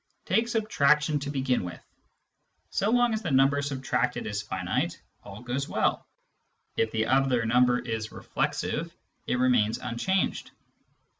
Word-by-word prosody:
Take 225 Hz, +1 st, +2 dB
subtraction 150 Hz, -, +2 dB
to 140 Hz, +1 st, -5 dB
begin 130 Hz, -5 st, 0 dB
with: 90 Hz, -1 st, -7 dB, 0.9 s
so 200 Hz, -, +1 dB
long 245 Hz, 0 st, +3 dB
as 220 Hz, -, -1 dB
the 175 Hz, -, -3 dB
number 135 Hz, +1 st, +4 dB
subtracted 135 Hz, -2 st, -1 dB
is 105 Hz, -1 st, -2 dB
finite, 95 Hz, -4 st, -2 dB, 0.2 s
all 105 Hz, +3 st, -10 dB
goes 130 Hz, +3 st, -3 dB
well; -, -, 0 dB, 0.7 s
if 115 Hz, -, +1 dB
the 110 Hz, 0 st, 0 dB
other 130 Hz, -2 st, +2 dB
number 125 Hz, +1 st, +4 dB
is 110 Hz, -3 st, -4 dB
reflexive, -, -, -2 dB, 0.4 s
it -, -, +1 dB
remains 120 Hz, -4 st, +3 dB
unchanged. 185 Hz, -, -1 dB
130 Hz, 135 wpm, -27 LUFS, 115-150 Hz, 0.9 s, number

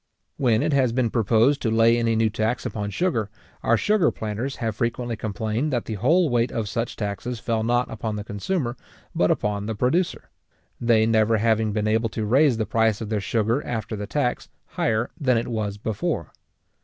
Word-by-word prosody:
When 120 Hz, -2 st, +2 dB
it 155 Hz, -1 st, +1 dB
has 130 Hz, -4 st, +3 dB
been 120 Hz, -2 st, 0 dB
proposed 115 Hz, +5 st, +3 dB
to 115 Hz, -, 0 dB
lay 115 Hz, +1 st, +4 dB
any 115 Hz, -1 st, +1 dB
new 110 Hz, -1 st, +2 dB
tax 110 Hz, +3 st, -1 dB
upon 105 Hz, -1 st, -3 dB
sugar, 110 Hz, -, -1 dB, 0.3 s
our 115 Hz, -, +3 dB
sugar 205 Hz, -, +3 dB
planters 110 Hz, +5 st, -4 dB
have 115 Hz, -5 st, -3 dB
frequently 120 Hz, +1 st, -2 dB
complained 110 Hz, +6 st, -2 dB
that 120 Hz, -3 st, -1 dB
the 110 Hz, -, -4 dB
whole 160 Hz, -, +3 dB
weight 120 Hz, -2 st, +1 dB
of 110 Hz, -2 st, -2 dB
such 115 Hz, +3 st, -3 dB
taxes 110 Hz, +3 st, -4 dB
fell 115 Hz, -2 st, -1 dB
not 120 Hz, +2 st, +1 dB
upon 110 Hz, -1 st, -3 dB
the 105 Hz, -, -4 dB
consumer, 120 Hz, -, -2 dB, 0.4 s
but 90 Hz, -, +2 dB
upon 105 Hz, 0 st, -1 dB
the 110 Hz, -, -2 dB
producer; 160 Hz, -, 0 dB, 0.5 s
they 115 Hz, -2 st, +3 dB
never 110 Hz, 0 st, +3 dB
having 110 Hz, 0 st, +2 dB
been 105 Hz, 0 st, -1 dB
able 110 Hz, +1 st, +1 dB
to 110 Hz, 0 st, -3 dB
raise 130 Hz, +3 st, +4 dB
the 110 Hz, -, 0 dB
price 110 Hz, -2 st, +1 dB
of 110 Hz, -, -5 dB
their 105 Hz, -2 st, -1 dB
sugar 115 Hz, +6 st, 0 dB
after 110 Hz, -1 st, -4 dB
the 105 Hz, -1 st, -5 dB
tax 125 Hz, -1 st, -1 dB, 0.2 s
higher 110 Hz, +2 st, 0 dB
than 130 Hz, -5 st, +2 dB
it 115 Hz, -, -1 dB
was 105 Hz, -4 st, -3 dB
before. 105 Hz, 0 st, -3 dB
115 Hz, 190 wpm, -24 LUFS, 110-125 Hz, 0.5 s, lay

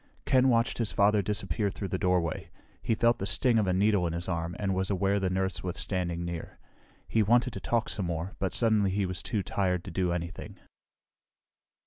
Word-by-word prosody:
Ken 130 Hz, 0 st, +4 dB
watched 115 Hz, -1 st, +1 dB
his 115 Hz, -3 st, 0 dB
father 105 Hz, +1 st, +3 dB
disappear 100 Hz, 0 st, -1 dB
through 100 Hz, 0 st, -5 dB
the 95 Hz, -, -2 dB
doorway. 90 Hz, -3 st, 0 dB, 0.3 s
He 115 Hz, -, 0 dB
felt 115 Hz, +2 st, +2 dB
the 100 Hz, -, -2 dB
sting 115 Hz, +5 st, +2 dB
of 105 Hz, -, +1 dB
a -, -, +2 dB
needle 100 Hz, -1 st, +2 dB
in 80 Hz, -, -3 dB
his 85 Hz, 0 st, -4 dB
arm 85 Hz, -1 st, -2 dB
and 100 Hz, -2 st, -1 dB
was 95 Hz, +1 st, -1 dB
aware 100 Hz, +1 st, +1 dB
the 95 Hz, -1 st, 0 dB
nurse 95 Hz, 0 st, -1 dB
was 90 Hz, -1 st, -4 dB
standing 85 Hz, -3 st, -2 dB
near. 85 Hz, -1 st, -6 dB, 0.5 s
He 110 Hz, -, +2 dB
wanted 120 Hz, +3 st, +3 dB
to -, -, -5 dB
talk 115 Hz, +2 st, 0 dB
some 95 Hz, -5 st, -2 dB
more, 85 Hz, +3 st, -3 dB
but 95 Hz, -, -1 dB
suddenly 110 Hz, -4 st, +2 dB
he 100 Hz, +1 st, 0 dB
was 90 Hz, -3 st, -3 dB
too 105 Hz, 0 st, -2 dB
tired 90 Hz, -3 st, -1 dB
to 95 Hz, -, -8 dB
do 90 Hz, 0 st, 0 dB
anything. 85 Hz, 0 st, -5 dB
95 Hz, 205 wpm, -29 LUFS, 90-105 Hz, 0.5 s, Ken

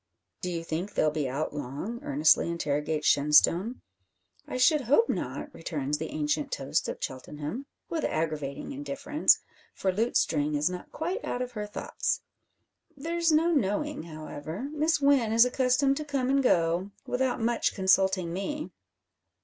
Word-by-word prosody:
"Do 180 Hz, -, -2 dB
you 170 Hz, -2 st, -3 dB
think 165 Hz, +5 st, -4 dB
they'll 155 Hz, -, +3 dB
be 150 Hz, -3 st, -1 dB
out 140 Hz, +4 st, -2 dB
long?" 150 Hz, -, -5 dB
earnestly 150 Hz, +4 st, +3 dB
interrogates 150 Hz, -2 st, -1 dB
Shenstone. 165 Hz, -, +4 dB, 0.7 s
"I -, -, -4 dB
should 290 Hz, +4 st, +4 dB
hope 285 Hz, -, +4 dB
not," 295 Hz, -, -3 dB
returns 150 Hz, -2 st, -3 dB
the 160 Hz, -, -4 dB
ancient 150 Hz, -1 st, -1 dB
toast 135 Hz, -1 st, -1 dB
of -, -, -4 dB
Cheltenham, 150 Hz, -, -5 dB, 0.2 s
with 325 Hz, -, -3 dB
aggravating 155 Hz, -, -2 dB
indifference, 280 Hz, +1 st, +1 dB, 0.3 s
for 190 Hz, -, 0 dB
Lutestring 160 Hz, -8 st, +1 dB
is 150 Hz, +4 st, +1 dB
not 180 Hz, 0 st, -8 dB
quite 360 Hz, +8 st, -3 dB
out 250 Hz, -, -2 dB
of 250 Hz, -, -6 dB
her 210 Hz, -3 st, -5 dB
thoughts. 205 Hz, -, -2 dB, 0.8 s
"There's 335 Hz, +3 st, 0 dB
no 325 Hz, +3 st, +4 dB
knowing, 295 Hz, -, 0 dB
however. 160 Hz, -, -6 dB
Miss 310 Hz, +1 st, +2 dB
Wynn 275 Hz, -6 st, +4 dB
is 230 Hz, +2 st, +6 dB
accustomed 260 Hz, +2 st, +2 dB
to 305 Hz, -, -3 dB
come 275 Hz, -3 st, -1 dB
and 275 Hz, 0 st, +3 dB
go, 175 Hz, -4 st, +2 dB, 0.2 s
without 250 Hz, 0 st, 0 dB
much 230 Hz, +1 st, 0 dB
consulting 190 Hz, -2 st, +2 dB
me." 295 Hz, -, -4 dB
195 Hz, 150 wpm, -28 LUFS, -, 0.8 s, is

